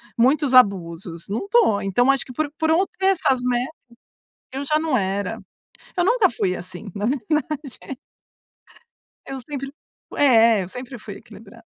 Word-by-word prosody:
muitos 265 +3 +2
abusos, 175 -7 +2
não 215 - -3
estou. 400 - +3
Então 245 +7 +3
acho 275 - 0
que 255 - -11
por 295 +2 -2
por 320 0 0
eu 350 +5 +4
ter 385 - +2
essas 320 -9 +2
metas 250 +4 -1 0.8
eu 275 +2 -4
já 305 +2 +2
não 310 -5 +1
era. 195 -1 -2 0.6
Eu 355 - +2
nunca 465 +2 +4
fui 185 -6 -1
assim, 185 +3 -8
na 205 +1 -2
verdade. 280 +1 -3 1.3
Eu 270 0 -5
sempre 275 +1 -6 0.5
é, 230 -6 +5
eu 180 - -9
sempre 250 +1 -7
fui - - -9
equilibrada. - - -14
255 Hz, 155 wpm, -22 LUFS, 205-300 Hz, 1.3 s, é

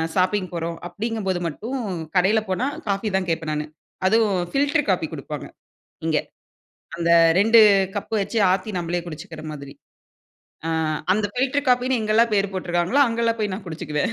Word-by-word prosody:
Shopping 185 0 +1
போறோம், 170 0 -3
அப்படிங்கும்போது 200 -2 -2
மட்டும் 230 - -5 0.4
கடையில 195 +4 +4
போனா, 190 +7 0 0.2
காஃபி 200 +2 0
தான் 190 -1 0
கேட்பேன் 160 -1 -1
நானு. 150 0 -2 0.4
அதுவும் 215 -2 +3
ஃபில்டர் 285 +1 +1
காஃபி - - +1
குடுப்பாங்க - - -6 0.6
இங்க. 155 -2 +2 0.8
அந்த 170 0 -1 0.3
2 225 +3 +6 0.4
கப்பு 205 +2 -3
வச்சு 210 +4 -3
ஆத்தி 190 +3 -1
நம்மளே 175 +1 -2
குடிச்சுக்கிற 155 -1 -8
மாதிரி. 140 -2 -9 0.9
ஆ - - -1 0.4
அந்த 205 +1 +1
பில்டர் 270 +3 0
காஃபின்னு 250 0 +3
எங்கல்லாம் 220 +2 +3
பேர் 200 -1 +1
போட்ருக்காங்களோ, 175 +7 0
அங்கல்லாம் 230 0 0
போய் 205 -2 -1
நான் 195 - -8
குடிச்சிக்குவேன். 160 +4 -2
195 Hz, 145 wpm, -23 LUFS, 170-230 Hz, 0.9 s, 2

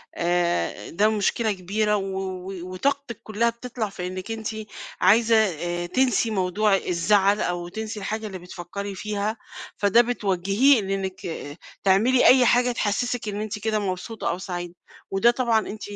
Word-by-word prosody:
آآ، 175 0 0
ده 210 +5 +2
مشكلة 220 +1 +1
كبيرة 210 +3 0
و 200 - -1 0.6
وطاقتثك 235 +7 -2
كُلّها 220 +2 +1
بتطلع 235 -2 -5
في 180 -2 -5
إنِّك 185 +4 -6
أنتِ 220 -1 -4 0.5
عايزة 185 -5 +3
تنسي 245 +1 +1
موضوع 195 +1 +2
الزعل، 200 +3 +2
أو 175 -1 -2
تنسي 220 +3 -5
الحاجة 215 +2 -3
اللي 190 -3 -6
بتفكّري 180 +3 -7
فيها 210 +2 -3 0.4
فدَه 205 +3 +5
بتوجّهيه 215 +2 +2
بإنِّك 190 -1 -3 0.6
تعملي 220 +7 +4
أي 255 -1 +7
حاجة 245 +1 +4
تحسِّسِك 235 +1 -1
إن 205 +1 -4
أنتِ 215 -1 -4
كده 215 0 0
مبسوطة 195 +3 -3
أو 175 - -1
سعيدة، 175 -2 -6 0.4
وده 195 +5 +4
طبعًا 240 -3 +2
أنتِ 215 +1 -7
205 Hz, 140 wpm, -24 LUFS, 185-225 Hz, 0.6 s, أي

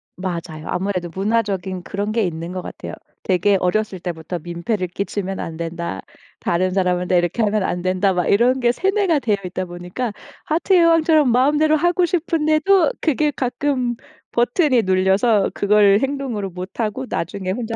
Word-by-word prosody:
맞아요. 170 -3 -5
아무래도 180 -2 -2
문화적인 195 -3 -1
그런 205 +3 -3
게 225 -1 +1
있는 170 -1 -4
것 185 0 -4
같아요. - - -8 0.3
되게 195 +2 +2
어렸을 190 +1 -1
때부터 170 0 -5
"민폐를 175 +4 -3
끼치면 195 +1 -4
안 160 -1 -5
된다. 170 - -4 0.4
다른 185 +2 0
사람한테 180 -1 +1
이렇게 175 +6 0
하면 210 -1 +1
안 180 -1 -2
된다." 185 +2 +1
막 180 -1 0
이런 245 +5 +3
게 240 -1 +3
세뇌가 380 - +1
되어 220 -6 +1
있다 185 +1 -3
보니까 180 +7 -5 0.3
하트의 345 +3 +3
여왕처럼 320 -4 +4
마음대로 295 +5 +3
하고 350 +3 +2
싶은데도 330 +4 +2
그게 305 -1 +1
가끔 255 -2 -1 0.4
버튼이 245 - +2
눌려서 190 +3 +2
그걸 205 0 +4
행동으로 265 -8 -2
못하고 205 +6 -4
나중에 185 +2 -3
혼자 225 +2 -3
205 Hz, 360 characters per minute, -20 LUFS, 180-260 Hz, 0.4 s, 여왕처럼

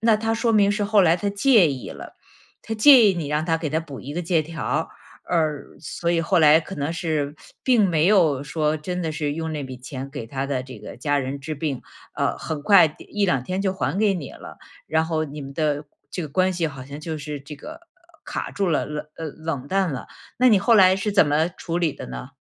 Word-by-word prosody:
那 225 0 +4
他 225 +1 -1
说 230 0 +1
明 205 -2 +4
是 210 +1 -1
后 210 0 +4
来 165 -1 +4
他 200 +3 -2
介 205 - +4
意 130 -2 -6
了， - - -10 0.5
他 225 - -4
介 250 +2 +8
意 190 - +2
你 160 -4 -4
让 150 +1 0
他 165 0 +1
给 160 -3 -3
它 155 - +1
补 145 -5 -9
一 140 +3 -7
个 175 - -1
借 165 -1 +1
条， 165 +1 -3 0.4
而 155 -4 -1
所 170 +2 -3
以 170 -1 +2
后 170 +2 +2
来 155 0 +6
可 195 +4 -8
能 145 +3 -2
是， 155 -4 -2 0.3
并 235 -6 +4
没 160 -1 +2
有 165 -10 +4
说 155 +1 0
真 180 +4 -4
的 160 - -2
是 150 -2 -2
用 160 0 -3
那 145 -2 -4
笔 130 -1 -7
钱， 130 +1 -7
给 135 -5 -6
他 135 +3 -3
的 130 -2 -2
这 130 0 -10
个 - - -10
家 145 -1 +1
人 135 +1 -4
治 155 +2 -5
病， 145 -3 -3 0.3
呃， - - 0
很 155 -2 -5
快 195 -2 +7
第 150 - -14
1-2 190 -11 0
天 185 +4 -2
就 190 - +1
还 190 0 -2
给 210 -2 +3
你 155 -7 -6
了。 - - -11 0.3
然 160 0 +1
后 160 -1 -1
你 150 0 -8
们 135 0 -9
的 150 -1 0 0.3
这 - - -4
个 155 - -5
关 185 +6 +1
系， 170 -2 -1
好 140 -4 -7
像 140 +2 -9
就 160 0 -4
是 145 -1 -6
这 145 +1 -10
个 330 - -10 0.5
卡 - - -4
住 195 -3 -1
了， 155 - +1
冷 150 0 -5
呃， 165 - -6
冷 155 -3 -5
淡 190 -3 +1
了。 130 - -6 0.3
那 255 +1 +6
你 210 - +6
后 230 +3 +3
来 185 -2 +7
是 205 +2 -2
怎 190 -6 +5
么 150 +3 +2
处 170 0 -4
理 165 -4 +1
的 - - -8
呢？ 60 0 -7
160 Hz, 255 characters per minute, -23 LUFS, 145-190 Hz, 0.5 s, 介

